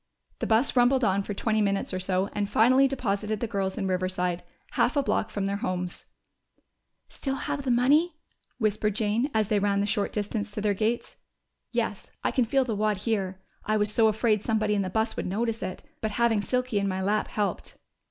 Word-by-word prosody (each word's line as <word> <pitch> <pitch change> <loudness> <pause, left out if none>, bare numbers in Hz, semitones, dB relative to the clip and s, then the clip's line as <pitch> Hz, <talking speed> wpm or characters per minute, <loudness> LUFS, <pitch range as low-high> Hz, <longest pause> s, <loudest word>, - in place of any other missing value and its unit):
The - - -2
bus 225 +5 +3
rumbled 250 +1 +4
on 200 -2 +2
for 200 +1 -5
twenty 215 +1 +1
minutes 200 -1 0
or 185 - -1
so 185 +1 0
and 205 -1 -1
finally 255 +5 +5
deposited 215 -5 -2
the 235 - -1
girls 195 -3 -2
in 200 - -1
Riverside, 185 -1 -1 0.3
half - - +1
a 285 - +3
block 225 - 0
from 200 -1 -2
their 200 0 -1
homes. 180 -3 -4 1.0
"Still 270 -1 -3
have 280 - -3
the 270 - -3
money?" 290 +8 +3 0.4
whispered 215 -2 0
Jane, 225 +4 +1
as 220 -3 +1
they 210 -2 +3
ran 200 0 +1
the 200 - +1
short 205 -1 0
distance 210 +1 -2
to 210 - -5
their 210 0 +1
gates. 220 +4 -2 0.5
"Yes, - - -2
I - - +1
can 255 -3 +2
feel 265 +3 +2
the 225 -4 -2
wad 210 0 +1
here. 190 -3 -2 0.2
I 215 +1 +1
was 210 0 +2
so 225 0 +5
afraid 215 -1 +2
somebody 215 -1 +1
in 205 - +1
the 185 - -2
bus 220 +4 0
would - - -3
notice 225 +4 -1
it. 185 - -5 0.2
But 220 - 0
having 235 -3 +3
Silky 250 -1 0
in 200 - 0
my 190 0 -2
lap 210 +2 +1
helped." 205 -2 -3
215 Hz, 205 wpm, -27 LUFS, 200-235 Hz, 1.0 s, finally